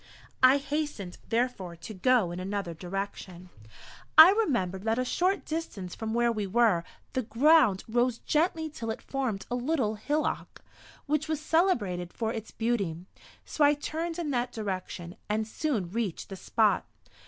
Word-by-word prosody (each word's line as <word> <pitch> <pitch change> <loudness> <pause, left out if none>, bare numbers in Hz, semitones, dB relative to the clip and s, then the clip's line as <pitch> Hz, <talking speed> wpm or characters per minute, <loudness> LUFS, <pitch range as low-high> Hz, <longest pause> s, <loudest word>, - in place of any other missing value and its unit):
I 260 +2 +7
hastened, 285 -10 -4
therefore, 225 -7 -1
to 170 +6 -9
go 215 -2 +2
in 175 - -5
another 195 -2 -3
direction. 180 0 -6 0.7
I 320 +4 +12
remembered 240 - 0
that 225 +1 +1
a 255 - 0
short 370 +9 0
distance 225 - -4
from 220 0 -4
where 240 0 +3
we 210 -3 -2
were 210 -4 +3 0.3
the 260 - +1
ground 245 - +4
rose 240 +1 +1
gently 320 +3 0
till 235 -7 -6
it 220 - -3
formed 255 -8 -3
a - - +1
little 250 -3 0
hillock, 290 +9 -2 0.4
which 300 +1 0
was 315 -2 -1
celebrated 240 - +1
for 225 -1 -2
its 225 -1 -6
beauty; 200 -8 -2 0.4
so 305 - 0
I 290 +1 +6
turned 325 +3 -4
in 330 -4 -2
that 245 -1 -1
direction, 185 -4 -5
and 215 +1 0
soon 220 - -2
reached 215 -5 -3
the 195 - -6
spot. 215 +2 +1
230 Hz, 155 wpm, -28 LUFS, 195-290 Hz, 0.7 s, I